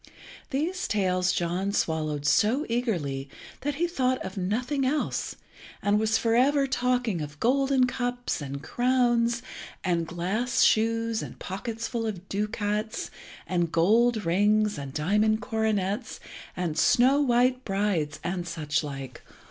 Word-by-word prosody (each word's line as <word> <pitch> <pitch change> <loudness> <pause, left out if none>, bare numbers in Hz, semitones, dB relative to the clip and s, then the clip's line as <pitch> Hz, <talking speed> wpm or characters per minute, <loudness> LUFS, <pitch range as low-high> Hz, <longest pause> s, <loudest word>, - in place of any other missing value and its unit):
These 325 +7 -1
tales 185 -3 +1
John 180 +3 -1
swallowed 155 -5 -1
so 230 - +3
eagerly 170 - -2 0.3
that 290 +1 -2
he 340 +4 +1
thought 260 -7 0
of 190 - -6
nothing 245 +9 -1
else, 290 +3 -1 0.4
and 205 +1 +2
was 220 0 +2
for 230 -1 +1
ever 275 +3 +4
talking 250 -7 0
of 150 0 -7
golden 270 +1 +3
cups, 245 -5 -2
and 140 0 -6
crowns, 240 -1 +1 0.4
and 170 -3 0
glass 195 +9 0
shoes, 230 0 +2
and - - -8
pockets 225 +4 -5
full 230 -2 -2
of 195 -3 -6
ducats, 210 +1 -2 0.3
and 175 -3 0
gold 220 +5 +3
rings, 210 +4 +3
and 140 -1 -6
diamond 210 +9 +2
coronets, 220 -2 -1 0.4
and 165 -3 -1
snow 260 - +4
white 250 -1 +2
brides, 195 -8 -1
and 175 0 -3
such 155 -2 -1
like. 135 -3 -7
215 Hz, 130 wpm, -27 LUFS, 175-245 Hz, 0.4 s, ever